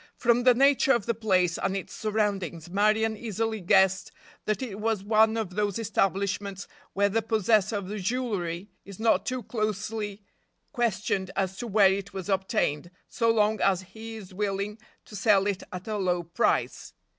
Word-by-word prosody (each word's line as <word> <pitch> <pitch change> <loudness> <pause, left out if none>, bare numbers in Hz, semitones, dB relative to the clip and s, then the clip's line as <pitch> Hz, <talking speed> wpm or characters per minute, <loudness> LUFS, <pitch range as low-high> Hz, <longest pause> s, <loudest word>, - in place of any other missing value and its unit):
From 240 0 +3
the 250 -1 +6
nature 275 +1 +4
of 235 -4 0
the 235 - +1
place 185 -6 +1
and 195 - -1
its 195 - -7
surroundings 200 -6 -2
Marion 215 +3 +2
easily 220 0 -3
guessed 190 0 +3 0.3
that 215 +5 -1
it 210 -5 -6
was 220 -2 -1
one 220 +1 +3
of 215 -5 -3
those 205 0 -1
establishments 200 -2 -1 0.3
where 200 +1 +3
the 220 +3 0
possessor 215 -1 +2
of 200 0 -4
jewelry 200 -4 -3
is 200 -1 -11
not 225 0 +2
too 255 -1 -2
closely 215 -1 -3 0.5
questioned 205 - -1
as 190 -1 -1
to 240 - -5
where 200 -3 +5
it 200 0 -5
was 190 0 -6
obtained, 190 -5 0 0.2
so 230 -1 +1
long 215 -1 +2
as 190 -1 +2
he 225 0 -8
is 195 -4 -10
willing 200 +2 -2 0.3
to 210 - -11
sell 200 -1 +3
it 200 -2 -1
at 180 +2 -7
a 215 -1 -2
low 180 -2 0
price. 170 +8 -1
205 Hz, 170 wpm, -27 LUFS, 190-220 Hz, 0.5 s, the